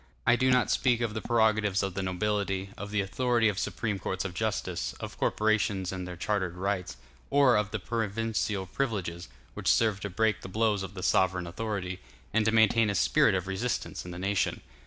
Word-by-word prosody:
I 115 - +5
do 130 +1 +2
not 125 -1 +3
speak 120 -3 +2
of 115 -3 -1
the 110 - -3
prerogatives 110 -4 +2
of 95 -2 -2
the 95 - -2
nobility, 95 +1 -1
of 100 - -7
the 105 0 +1
authority 120 +3 +2
of 100 -1 -2
supreme 105 -4 -2
courts 95 +1 -3
of 95 - -4
justice, 95 -3 -2
of - - -6
corporations 105 -3 +1
and 95 -1 -5
their 90 - -6
chartered 95 -2 -1
rights, 95 0 -2 0.3
or 140 -3 +5
of 105 -2 +1 0.2
provincial 110 -3 -1
privileges, 95 -7 -3 0.3
which - - -6
served 110 -3 +3
to 100 - -3
break 110 +2 +1
the - - -8
blows 105 0 +1
of 95 0 -6
the 90 - -6
sovereign 90 -1 +2
authority, 95 0 -4 0.3
and 110 0 +2
to 110 - +3
maintain 110 0 +4
a 100 - -1
spirit 95 - +4
of 90 -1 -1
resistance 95 +6 -3
in 90 - -9
the 90 - -7
nation. 95 +1 0
100 Hz, 195 wpm, -29 LUFS, 95-110 Hz, 0.3 s, I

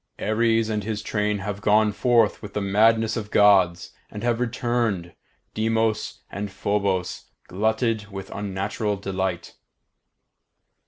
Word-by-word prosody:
Ares 115 +1 +1
and 105 -1 -2
his 105 0 -4
train 105 -1 0
have 100 -1 -4
gone 105 +1 +4
forth 115 +1 +2
with 105 -2 -9
the - - +1
madness 110 +3 +3
of 105 -3 -4
Gods, 95 -5 +4 0.2
and 105 - -8
have 120 -1 +1
returned, 115 -7 -1 0.4
Deimos 110 0 -1
and 100 +1 -5
Phobos 95 -1 -1 0.2
glutted 110 +2 0
with 95 -1 -8
unnatural 100 +1 -2
delight. 95 -3 -3
105 Hz, 120 wpm, -24 LUFS, 100-110 Hz, 0.4 s, gone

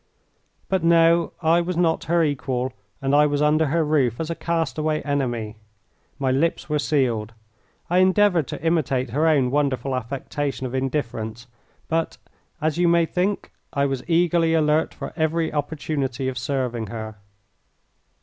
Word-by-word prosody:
But 190 -3 0
no, 170 0 +4
I 165 +2 +4
was 175 0 -3
not 165 -2 +1
her 170 0 +2
equal, 130 -3 -1 0.3
and 135 +1 +1
I 150 +1 +5
was 145 -1 -1
under 150 +1 +3
her 165 +3 +1
roof 135 -6 +1
as 160 0 -3
a - - -2
castaway 155 -2 -1
enemy. 120 -7 -2 0.6
My 135 -2 0
lips 155 +6 0
were 150 -1 0
sealed. 120 -8 0 0.5
I 180 +2 +2
endeavoured 185 -4 +3
to - - -6
imitate 140 -7 0
her 150 +6 +2
own 135 -6 +3
wonderful 135 -2 0
affectation 135 +2 -3
of 125 - -5
indifference, 120 -4 -3 0.4
but, 165 0 -1 0.4
as 155 +1 -1
you 175 - +4
may 170 0 +4
think? 185 +4 -2 0.2
I 140 -2 +1
was 135 -2 -2
eagerly 170 -1 +3
alert 155 0 +2
for - - -7
any 160 0 0
opportunity 145 -3 -2
of 130 - -2
serving 125 -3 -2
her. 110 0 -7
150 Hz, 150 wpm, -23 LUFS, 130-165 Hz, 0.6 s, I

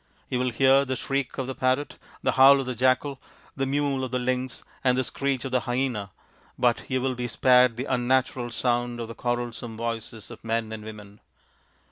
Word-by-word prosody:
You 125 - 0
will 125 0 +1
hear 135 +3 +4
the 130 -1 -2
shriek 135 +1 -2
of 135 - -2
the 130 - -4
parrot, 130 +3 0 0.3
the - - +3
howl 135 +1 +7
of 135 - -2
the 125 - -3
jackal, 130 +3 +1 0.3
the 135 0 -1
mewl 140 -1 0
of 130 - -2
the 125 - -1
lynx, 125 0 -2 0.2
and 125 -1 +3
the 130 - +2
screech 135 0 -2
of 135 - -4
the 130 - +3
hyena, 120 -4 -2 0.5
but 120 -2 +1
you 130 -1 +1
will 130 0 0
be 125 0 -3
spared 125 0 +4
the 130 - -3
unnatural 125 -1 +1
sound 120 0 -1
of 115 - -4
the 115 - -7
quarrelsome 120 -1 -3
voices 115 -1 -5
of - - -11
men 115 -1 -1
and 110 -1 -6
women. 105 -1 -10
125 Hz, 200 wpm, -26 LUFS, 120-130 Hz, 0.5 s, howl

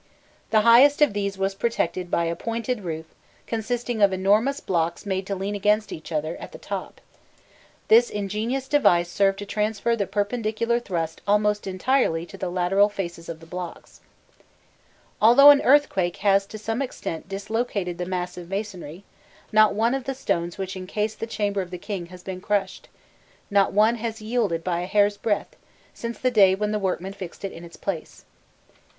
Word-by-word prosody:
The 215 - +4
highest 245 +6 +6
of 290 - +2
these 200 -1 -2
was 195 0 0
protected 185 -4 -2
by 170 - +1
a 165 0 -1
pointed 230 +4 -3
roof 160 -2 -4 0.4
consisting 235 0 -2
of 200 -1 +6
enormous 210 +9 +2
blocks 170 0 -1
made 190 -1 -2
to 200 - -2
lean 195 +2 -3
against 210 +2 +1
each 160 - -8
other 155 +1 -2
at - - -10
the - - -8
top: - - -6 0.9
this 235 +2 +6
ingenious 215 +6 -3
device 175 -12 +3
served 195 0 +2
to 205 - -6
transfer 215 +2 0
the 200 -4 -2
perpendicular 220 +2 -1
thrust 165 -8 -4
almost 210 0 +2
entirely 185 -3 +1
to - - -12
the 185 - -4
lateral 185 +3 +2
faces 175 -4 -6
of 165 -1 -7
the - - -12
blocks. 180 0 -8 1.2
Although 275 +6 +9
an 285 - +4
earthquake 200 -11 +3
has 195 0 +4
to 215 - -8
some 225 +4 -3
extent 190 -10 -5
dislocated 200 -3 -3
the 175 - -3
mass 180 -1 -3
of 175 -1 -9
masonry, 195 -4 -5 0.5
not 215 -1 +5
one 230 +3 +2
of 270 -2 -3
the 270 - -3
stones 170 -8 -2
which 190 -1 -4
encase 210 +3 -3
the 225 - -6
chamber 205 -3 -1
of 180 - -7
the 180 - -6
king 180 -2 -5
has 180 0 -13
been 185 -1 -6
crushed, 195 -1 -2 0.6
not 200 -1 +3
one 215 +4 +3
has 225 0 -4
yielded 215 -7 -1
by 175 -1 -1
a 180 - -4
hair's 205 0 +2
breadth, 220 - -2 0.4
since 235 0 -6
the 255 - 0
day 195 -5 +5
when 210 +1 -2
the 210 - 0
workmen 190 0 -2
fixed 195 -1 -8
it 195 - -4
in 165 - -11
its 170 0 -12
place. 185 -6 -5
200 Hz, 180 wpm, -24 LUFS, 180-225 Hz, 1.2 s, Although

